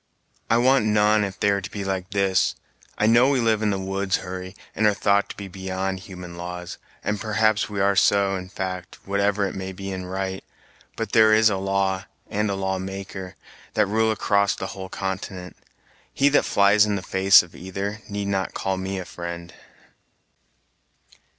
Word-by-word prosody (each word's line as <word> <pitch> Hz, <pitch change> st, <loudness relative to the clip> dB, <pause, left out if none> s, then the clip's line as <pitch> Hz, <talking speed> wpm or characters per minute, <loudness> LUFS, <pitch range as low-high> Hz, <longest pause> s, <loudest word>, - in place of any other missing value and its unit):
"I 115 Hz, -, +4 dB
want 130 Hz, -1 st, +4 dB
none, 105 Hz, 0 st, +3 dB
if 95 Hz, -1 st, -5 dB
they 100 Hz, -, +3 dB
are 100 Hz, 0 st, 0 dB
to 95 Hz, -, -6 dB
be 100 Hz, -, -5 dB
like 95 Hz, -1 st, -3 dB
this. 95 Hz, -3 st, +1 dB, 0.4 s
I 105 Hz, -, +2 dB
know 120 Hz, +4 st, +5 dB
we 140 Hz, -2 st, +2 dB
live 110 Hz, -2 st, +2 dB
in 105 Hz, -, +1 dB
the 100 Hz, -, 0 dB
woods, 95 Hz, 0 st, -1 dB
Hurry, 95 Hz, +1 st, -6 dB, 0.2 s
and 105 Hz, -, +2 dB
are 105 Hz, -, +3 dB
thought 100 Hz, 0 st, +2 dB
to -, -, -8 dB
be 100 Hz, -, -6 dB
beyond 95 Hz, 0 st, -3 dB
human 90 Hz, -2 st, -10 dB
laws, 90 Hz, 0 st, -6 dB, 0.2 s
and 105 Hz, -1 st, -2 dB
perhaps 110 Hz, -1 st, +1 dB
we 105 Hz, -1 st, -4 dB
are 100 Hz, 0 st, +3 dB
so, 100 Hz, +1 st, +3 dB
in 90 Hz, -1 st, -6 dB
fact, 95 Hz, -2 st, -5 dB
whatever 100 Hz, +1 st, +1 dB
it -, -, -6 dB
may 95 Hz, 0 st, -5 dB
be 95 Hz, +1 st, -6 dB
in 95 Hz, -1 st, -5 dB
right, 95 Hz, 0 st, -3 dB, 0.5 s
but 115 Hz, -, -4 dB
there 110 Hz, -1 st, +6 dB
is 110 Hz, 0 st, +5 dB
a 100 Hz, -, 0 dB
law 95 Hz, 0 st, 0 dB, 0.3 s
and 105 Hz, +1 st, 0 dB
a 100 Hz, -, -1 dB
law 95 Hz, -1 st, -1 dB
maker, 95 Hz, 0 st, -7 dB, 0.4 s
that 105 Hz, -, +4 dB
rule 110 Hz, +2 st, +1 dB
across 100 Hz, -2 st, +2 dB
the -, -, -5 dB
whole 95 Hz, -1 st, -7 dB
continent. 95 Hz, -1 st, -5 dB, 0.6 s
He 140 Hz, +1 st, +3 dB
that 145 Hz, -, +3 dB
flies 100 Hz, +1 st, +5 dB
in 105 Hz, -, 0 dB
the 95 Hz, -, -4 dB
face 95 Hz, 0 st, +6 dB
of 85 Hz, -, -15 dB
either 100 Hz, +3 st, -5 dB
need 100 Hz, 0 st, -3 dB
not 95 Hz, -1 st, -2 dB
call 95 Hz, -1 st, -1 dB
me 95 Hz, +1 st, -3 dB
a 95 Hz, -, -5 dB
friend." 85 Hz, -1 st, -7 dB
95 Hz, 190 wpm, -24 LUFS, 95-105 Hz, 0.6 s, there